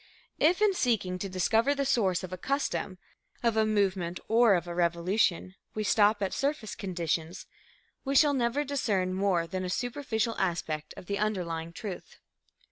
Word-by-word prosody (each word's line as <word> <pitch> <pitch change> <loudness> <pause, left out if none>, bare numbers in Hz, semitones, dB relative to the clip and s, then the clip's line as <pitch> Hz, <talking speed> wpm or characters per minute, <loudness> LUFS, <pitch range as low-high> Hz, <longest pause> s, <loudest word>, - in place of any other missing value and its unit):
If, 355 +7 +3
in 415 -2 +4
seeking 215 - 0
to 195 - -4
discover 225 +9 +2
the 280 0 -1
source 200 -9 +1
of 185 0 -6
a - - -4
custom, 270 -7 -2 0.5
of 230 -2 +2
a 220 0 +3
movement 190 -4 0
or 225 -2 +5
of 175 - -1
a 175 - -5
revolution, 175 +2 +1 0.2
we 215 - -1
stop 205 0 +3
at 190 - -1
surface 275 -7 -2
conditions, 170 -3 -3 0.6
we 275 0 -2
shall 290 +1 +6
never 255 +2 +1
discern 210 -10 0
more 190 -3 +1
than 185 +2 -4
a 180 - -3
superficial 235 0 -2
aspect 165 -4 -2
of - - -9
the 200 +2 -2
underlying 170 -6 -2
truth. 190 +1 -8
200 Hz, 165 wpm, -29 LUFS, 180-235 Hz, 0.6 s, shall